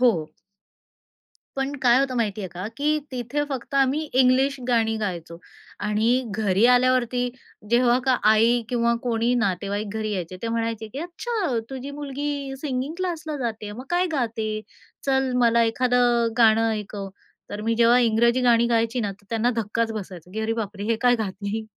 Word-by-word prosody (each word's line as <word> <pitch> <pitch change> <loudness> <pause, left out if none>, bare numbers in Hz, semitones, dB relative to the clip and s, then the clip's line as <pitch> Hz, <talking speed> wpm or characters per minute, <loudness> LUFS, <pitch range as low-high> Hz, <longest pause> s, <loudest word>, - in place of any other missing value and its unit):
हो. 190 -12 +3 1.3
पण 270 +1 -1
काय 245 0 +5
होतं 265 -2 -1
माहिती 215 -3 -1
आहे 190 - -4
का, 180 +3 -6
की 300 +2 +1
तिथे 255 +4 -2
फक्त 270 0 -5
आम्ही 275 +2 +3
इंग्लिश 260 +2 +3
गाणी 225 -2 +2
गायचो 170 -5 -4 0.5
आणि 225 +5 +2
घरी 200 0 +1
आल्यावरती 250 0 +3 0.4
जेव्हा 240 +1 +4
का 260 -2 +3
आई 230 +2 +4
किंवा 235 -1 +1
कोणी 235 0 +1
नातेवाईक 205 -2 -1
घरी 215 -1 -2
यायचे 185 -2 -4
ते 230 - -2
म्हणायचे 230 -1 -2
की - - -5
"अच्छा, 350 - -2
तुझी 265 +1 -6
मुलगी 285 -1 -4
सिंगिंग 275 +1 -3
क्लासला 325 -4 -3
जाते, 225 -5 -4
मग 245 +5 -8
काय 355 +1 +2
गाते? 220 -5 -2 0.5
चल 265 -1 +1
मला 235 -1 +4
एखादं 240 0 +2
गाणं 225 -1 +5
ऐकव," 205 -2 -5 0.4
तर 205 - -5
मी 230 +1 +1
जेव्हा 235 +1 +5
इंग्रजी 235 +1 +3
गाणी 235 -1 +4
गायची 230 +1 +1
ना, 205 -3 -2
तर 200 +1 -21
त्यांना 230 +1 +1
धक्काच 225 +1 -1
बसायचा, 185 -5 -8
की 220 - -3
"अरे 220 +1 0
बापरे! 205 -3 -4
हे 225 +1 +1
काय 245 0 +5
गाते?" 205 +1 -4
235 Hz, 165 wpm, -24 LUFS, 220-255 Hz, 1.3 s, काय